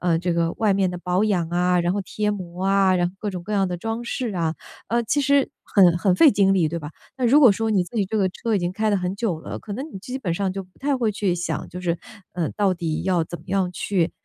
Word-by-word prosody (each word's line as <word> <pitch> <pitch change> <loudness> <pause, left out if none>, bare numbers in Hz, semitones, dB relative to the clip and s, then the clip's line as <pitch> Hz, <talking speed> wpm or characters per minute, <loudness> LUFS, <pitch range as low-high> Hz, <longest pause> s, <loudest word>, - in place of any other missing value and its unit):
呃， 170 -2 +2
这 175 0 -1
个 170 0 +1
外 215 -3 +2
面 190 -2 +1
的 180 - -5
保 180 +2 0
养 180 -6 +1
啊， 180 +1 +2
然 175 +1 +1
后 205 - -1
贴 210 +2 -2
膜 180 -1 -6
啊， 195 -1 +3
然 175 0 +2
后 180 - -7
各 210 - -4
种 180 -2 -6
各 215 - -5
样 195 -2 +2
的 180 - -3
装 225 +5 -4
饰 240 -2 -3
啊。 165 -2 -1 0.3
呃， 235 +1 +1
其 290 +6 +1
实 280 0 +3 0.2
很 180 -4 +4
很 185 -1 +2
费 295 - +7
精 195 -1 +3
力， 175 -4 +3
对 170 +2 -3
吧？ 150 -2 -7 0.3
那 250 - +1
如 280 +6 +6
果 255 -8 +7
说 225 +2 -1
你 190 -4 +2
自 230 +6 -10
己 200 -3 +1
这 220 - -3
个 195 -3 +2
车 225 +3 -2
已 - - +3
经 175 0 -2
开 215 +2 0
了 205 - +3
很 180 0 -2
久 200 -6 -2
了， - - -6
可 205 - -7
能 265 - -4
你 - - -6
基 250 +7 -6
本 190 -10 -2
上 190 +3 -1
就 195 +1 -4
不 185 0 -23
太 280 0 0
会 230 -4 0
去 200 -3 0
想， 175 0 -3
就 180 +1 -8
是， 170 -1 -1 0.3
呃， 170 -3 -1
到 200 -3 +1
底 165 -3 -3
要 180 -3 +1
怎 175 +2 -7
么 160 - -18
样 190 -1 +1
去 180 -3 0
190 Hz, 305 characters per minute, -23 LUFS, 175-215 Hz, 0.3 s, 费